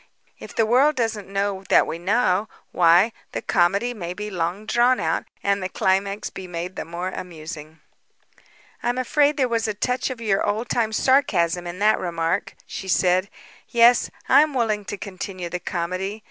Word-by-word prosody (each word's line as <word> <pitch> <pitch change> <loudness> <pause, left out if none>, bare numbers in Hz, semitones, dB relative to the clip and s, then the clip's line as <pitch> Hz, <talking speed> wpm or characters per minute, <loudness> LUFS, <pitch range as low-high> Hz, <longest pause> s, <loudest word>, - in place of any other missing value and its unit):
If - - -11
the 225 - +3
world 265 +7 +4
doesn't 225 -4 -2
know 195 0 -2
that - - +5
we 165 - -5
know, 200 +1 +1 0.2
why, 175 +5 +5 0.2
the - - -3
comedy 200 +7 +2
may 180 -5 -6
be 210 +1 -5
long 180 +3 -2
drawn 240 +3 +3
out 160 0 -1 0.2
and 200 0 +1
the 185 - -3
climax 195 +2 0
be 190 - -8
made 175 +1 -5
the - - -5
more 170 +3 -4
amusing." 160 -3 -8 1.0
"I'm 245 +1 -1
afraid 290 +4 +2
there 265 -3 +2
was 230 -2 0
a 215 - -2
touch 250 +6 -1
of 255 -2 -6
your 210 -4 +1
old 215 +4 -1
time 225 -2 +1
sarcasm 180 -9 +2
in 175 +1 -6
that 210 +2 +3
remark," 170 +1 -2
she 190 - -7
said. 185 +1 +2 0.4
"Yes, 235 +1 +5 0.2
I - - +7
am 300 -2 0
willing 215 -4 0
to 205 - -5
continue 185 -2 -6
the 180 - -4
comedy. 185 +4 -3
200 Hz, 175 wpm, -23 LUFS, 180-230 Hz, 1.0 s, I